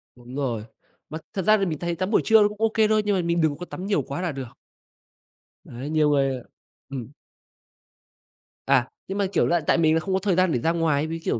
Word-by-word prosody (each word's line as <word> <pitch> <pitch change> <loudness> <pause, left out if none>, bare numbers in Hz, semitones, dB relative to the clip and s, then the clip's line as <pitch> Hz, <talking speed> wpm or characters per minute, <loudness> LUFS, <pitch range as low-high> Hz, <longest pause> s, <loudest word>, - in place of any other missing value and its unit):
Đúng 125 +1 -12
rồi. 120 -6 -2 0.4
Mà 155 - -5 0.2
thật 195 - -1
ra 215 +1 +6
thì 195 - 0
mình 155 -5 -3
thấy 175 -1 -2
tắm 185 +4 -3
buổi - - +4
trưa 220 -1 +6
nó 205 - +5
cũng 210 +1 -9
OK 220 -1 +3
thôi, 215 0 +3
nhưng 205 -1 +2
mà 185 - +1
mình 170 0 0
đừng 155 -3 +1
có 180 - -7
tắm 180 +1 -7
nhiều 200 -7 +1
quá 140 +6 -5
là 175 - -1
được. 130 -3 -8 1.1
Đấy, 130 +5 -7
nhiều 155 -1 +2
người, 135 -2 +2
ờ 125 - -11 0.5
ừm. 135 -2 -6 1.6
À, 125 - +3 0.2
nhưng 195 - -4
mà, 200 - +1
kiểu - - +3
là, 175 0 +2
tại - - +4
mình 160 -2 +3
là 165 - +3
không 190 +4 -3
có 190 - +2
thời 190 -2 0
gian 185 -1 +3
để 125 - +1
ra 165 +6 +1
ngoài, 160 -3 +1
với, 165 +1 -4
kiểu, - - 0
165 Hz, 250 wpm, -24 LUFS, 140-190 Hz, 1.6 s, ra